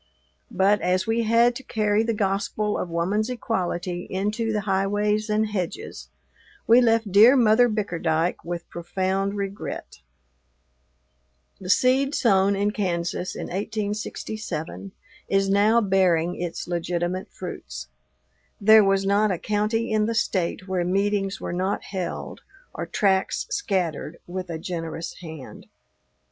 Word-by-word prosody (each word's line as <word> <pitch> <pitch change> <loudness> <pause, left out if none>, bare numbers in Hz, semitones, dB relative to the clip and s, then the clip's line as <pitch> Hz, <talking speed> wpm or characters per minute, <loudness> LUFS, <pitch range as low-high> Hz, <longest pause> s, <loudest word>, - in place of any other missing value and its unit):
But, 200 -1 +2
as 185 +1 +1
we 225 +1 +1
had 235 +2 +4
to - - -9
carry 215 -4 +1
the 230 +1 0
gospel 205 +1 -1
of 180 - -3
woman's 190 +7 0
equality 180 -7 -3
into 210 +4 -1
the 210 -1 0
highways 205 +2 0
and 215 0 +1
hedges, 205 - -5 0.6
we 235 +2 +6
left 225 -3 +2
dear 220 +7 +8
Mother 240 0 +5
Bickerdyke 175 -5 -1
with 170 0 -5
profound 190 +3 -2
regret. 200 0 -5 1.6
The 185 - -8
seed 265 +6 +3
sown 200 -4 +3
in 205 +1 +1
Kansas 180 -3 -2
in - - -5
1867 205 -3 -4 0.4
is 195 0 +2
now 210 +4 +4
bearing 180 -4 +2
its 175 -1 -5
legitimate 175 +1 -2
fruits. - - -7 0.7
There 215 +1 +7
was 195 0 +2
not 205 +2 +3
a 185 - 0
county 215 +5 -1
in 215 -1 +2
the 230 - -1
State 185 -3 -1
where 185 -2 0
meetings 195 +2 0
were - - -4
not 185 +3 -1
held 190 -3 -5 0.3
or - - -5
tracts 190 -3 +1
scattered 180 - -2
with 185 0 -6
a 165 - -3
generous 165 -1 -5
hand. 160 -6 -10
195 Hz, 130 wpm, -24 LUFS, 180-215 Hz, 1.6 s, dear